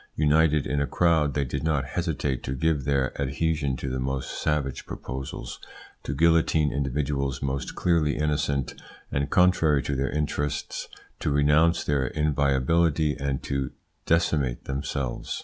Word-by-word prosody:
United 75 -1 +3
in 75 - 0
a 70 - 0
crowd, 80 -5 +2
they 70 - +1
did 65 +2 -4
not 75 -4 +1
hesitate 75 -6 -2
to 65 - -4
give 75 -1 0
their 70 -2 +1
adhesion 70 0 0
to 70 - -5
the 65 0 -2
most 65 +1 -2
savage 75 -4 -1
proposals, 65 -1 -6 0.4
to 70 - -4
guillotine 80 -1 +3
individuals 70 0 -1
most 70 0 -3
clearly 80 -4 +1
innocent, 75 -3 0 0.4
and, 70 +1 -1
contrary 80 -6 +4
to 70 - -2
their 65 0 0
interests, 75 -1 -2 0.3
to - - -1
renounce 75 +4 +3
their 70 -3 0
inviolability 75 +2 +2
and 70 -1 -2
to 70 -2 -2 0.3
decimate 75 -7 +1
themselves. 70 -2 -3
70 Hz, 140 wpm, -26 LUFS, 70-75 Hz, 0.4 s, contrary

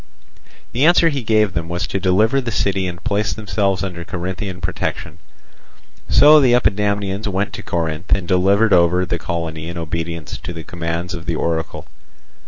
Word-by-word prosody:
The 125 +4 0
answer 170 0 +5
he 140 -3 -2
gave 110 -3 +2
them 85 -1 -3
was 90 +2 -2
to 100 - -3
deliver 105 +8 +2
the 125 - -4
city 95 -2 0
and 85 0 -7
place 105 -2 0
themselves 100 -3 -1
under 90 -3 -5
Corinthian 90 +2 -5
protection. 90 0 -4 0.9
So 150 +1 +7
the 125 -3 +4
Epidamnians 100 -2 0
went 100 +1 -2
to - - -6
Corinth 85 -1 -3
and 95 -3 +2
delivered 100 +4 +3
over 90 +1 +4
the 85 -1 -2
colony 80 -1 -4
in 85 - -6
obedience 85 -1 -4
to 90 - -6
the 85 -1 -7
commands 85 +2 -4
of 85 -2 -7
the 85 - 0
oracle. 80 0 -2
90 Hz, 170 wpm, -19 LUFS, 85-105 Hz, 0.9 s, So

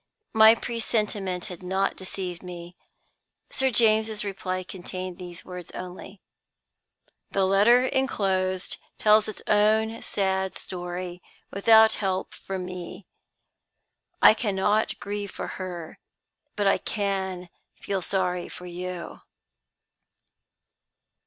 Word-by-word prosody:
My 220 +1 +8
presentiment 210 -6 -2
had 180 -5 -8
not 190 +2 0
deceived 185 -2 -5
me. 175 -1 -9 0.8
Sir 265 0 +1
James's 220 -2 +3
reply 185 -2 -3
contained 185 0 -7
these 175 -1 -7
words 180 -2 -8
only: 185 +2 -8 1.1
"The 195 -1 +2
letter 210 +6 +5
inclosed 190 -9 0 0.2
tells 215 0 +5
its 215 - -7
own 220 +2 +3
sad 190 -1 -1
story, 180 0 -6 0.3
without 220 +2 +6
help 190 -2 -2
from 190 -1 -5
me. 180 +1 -7 1.2
I - - +10
cannot 210 0 0
grieve 205 0 -4
for - - -6 0.2
her; 175 -3 -6 0.6
but 205 - 0
I 195 - +4
can 190 -3 -2 0.3
feel 195 -1 -2
sorry 180 0 -1
for 180 - -10
you." 180 0 -6
190 Hz, 105 wpm, -26 LUFS, 180-210 Hz, 1.2 s, I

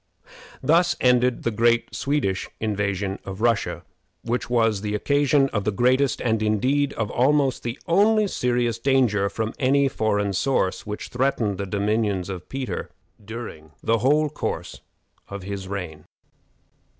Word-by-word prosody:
Thus 170 +3 +3
ended 125 0 +3
the 115 - 0
great 115 +2 +2
Swedish 135 -10 -1
invasion 100 -2 -2
of 95 0 -7
Russia, 100 -7 0 0.4
which 120 +1 -2
was 115 -4 +2
the 105 0 -2
occasion 140 +3 +2
of 105 -5 -2
the 105 - 0
greatest 130 +6 +2
and, 110 -2 +1
indeed, 130 +7 +1
of 110 -2 -3
almost 135 +1 +2
the 120 +2 -4
only 210 +5 +4
serious 120 - 0
danger, 115 -7 +2
from 110 +2 -3
any 140 +1 +3
foreign 105 -5 0
source, 95 -3 0
which 105 0 -5
threatened 120 -6 0
the 100 - -3
dominions 100 -1 0
of 90 -2 -7
Peter 130 -9 -4 0.3
during 100 -9 -8
the 115 0 +2
whole 150 +6 +3
course 150 - -4 0.5
of 100 -1 -7
his 100 0 -5
reign. 90 -6 -6
115 Hz, 140 wpm, -24 LUFS, 100-135 Hz, 0.5 s, only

